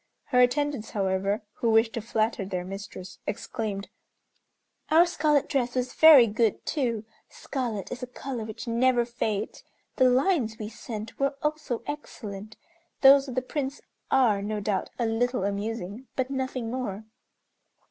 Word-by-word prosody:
Her 250 - +3
attendants, 260 -1 +2
however, 195 +1 0
who 235 - +1
wished 225 0 +4
to 230 - -3
flatter 220 -1 0
their 185 -2 -4
mistress, 185 -1 -8
exclaimed, 210 -2 -4 1.0
"Our 325 +3 +7
scarlet 300 -5 +2
dress 255 -4 -1
was 250 0 -1
very 310 -6 +9
good, 220 0 0
too. 235 -7 -1 0.2
Scarlet 235 -7 -4
is 250 - -5
a 250 - -4
color 250 -1 -5
which 220 +2 -7
never 240 +1 +3
fades. 220 -3 -3 0.3
The 255 -2 +6
lines 255 - +2
we 215 -1 -5
sent 220 -1 -7
were 275 0 +1
also 300 -6 -2
excellent. 215 -8 -7 0.4
Those 275 0 +7
of 255 - -6
the 255 - 0
Prince 275 +1 -3 0.3
are, 235 -7 +3
no 210 +1 -2
doubt, 200 -2 -1
a 235 - 0
little 235 0 0
amusing, 205 +3 -3
but 260 0 -1
nothing 260 -3 -3
more." 230 -5 -4
235 Hz, 145 wpm, -27 LUFS, 210-260 Hz, 1.0 s, very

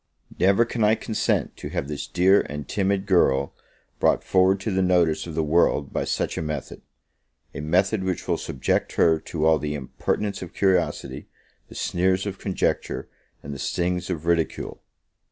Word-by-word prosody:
Never 100 +5 +4
can 115 -1 -2
I 105 +1 +5
consent 110 -1 -1
to - - -6
have - - -3
this 75 -1 -5
dear 95 +3 +4
and 75 0 -6
timid 100 -1 0
girl 70 -8 +2 0.5
brought - - +3
forward 95 +1 +3
to 110 - -2
the 95 0 +1
notice 90 -3 +2
of 80 - -7
the 80 - +1
world 75 -2 +2
by - - -1
such - - -1
a - - -2
method; 75 -3 -5 0.7
a - - -5
method 95 +6 +1
which 95 -2 -3
will - - 0
subject 65 - -1
her 80 -1 +3
to 80 0 -3
all 80 -1 +4
the 75 0 -3
impertinence 95 +8 -3
of 90 - -9
curiosity, 95 -3 0 0.4
the - - -14
sneers 95 +2 0
of 100 -2 -5
conjecture, 95 -3 -2 0.3
and 70 - -6
the 70 - -7
stings 90 +4 -1
of 85 -3 -3
ridicule. 85 -1 -1
90 Hz, 170 wpm, -24 LUFS, 75-95 Hz, 0.7 s, I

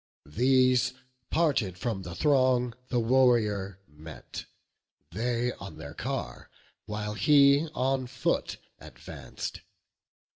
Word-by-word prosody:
These, 125 - +3 0.4
parted 135 - +1
from 105 -1 -3
the 85 -2 -8
throng, 130 - +2
the 125 - 0
warrior 115 -6 +2
met; 75 +1 -10 0.7
They 120 +4 -1
on 95 -6 -10
their 70 -2 -9
car, - - -5 0.4
while 105 0 -4
he 140 - +5
on 130 0 0
foot - - -1 0.2
advanc'd. 60 -3 -8
120 Hz, 100 wpm, -28 LUFS, 95-130 Hz, 0.7 s, he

